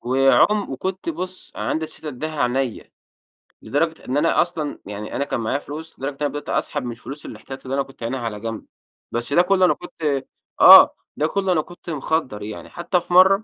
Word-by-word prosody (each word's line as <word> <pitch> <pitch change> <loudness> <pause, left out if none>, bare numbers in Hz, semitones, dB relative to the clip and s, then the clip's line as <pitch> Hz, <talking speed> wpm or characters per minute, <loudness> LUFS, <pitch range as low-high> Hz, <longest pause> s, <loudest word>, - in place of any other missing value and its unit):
وعم 135 +11 +3
وكنت 190 - -4
بُص 185 - -5
عندي 160 0 -1
إستعداد 155 -2 -7
أديها 155 -3 -2
عينيّا، 125 -1 -1 0.7
لدرجة 160 +3 -1
إن 130 +3 -1
أنا 165 +3 +3
أصلًا 160 -4 -3
يعني 105 +1 -6
أنا - - 0
كان 130 - -2
معايا 115 +5 -1
فلوس 155 +2 -9
لدرجة 135 +1 -4
أنا 145 - +1
بدأت 145 0 -6
أسحب 145 -3 -1
من 120 - -4
الفلوس 135 +5 -9
الأحتياطي 135 0 -9
اللي 130 - -4
أنا 140 - +1
كنت 135 -3 -13
عَاينها 130 +3 -2
على 115 -3 -4
جنب، 115 0 -5 0.5
بس 120 +4 -2
ده 175 - +6
كلّه 185 +1 +3
أنا - - +4
كنت 150 -6 -3 0.4
آه، - - +10 0.2
ده 155 - +2
كلّه 195 +1 0
أنا 160 -4 +3
كنت 175 +1 -12
مخدّر 145 -7 -1
يعني 105 +1 -7
حتّى 175 +1 0
في 175 - -7
مرّة 190 +3 +6
145 Hz, 195 wpm, -22 LUFS, 130-175 Hz, 0.7 s, آه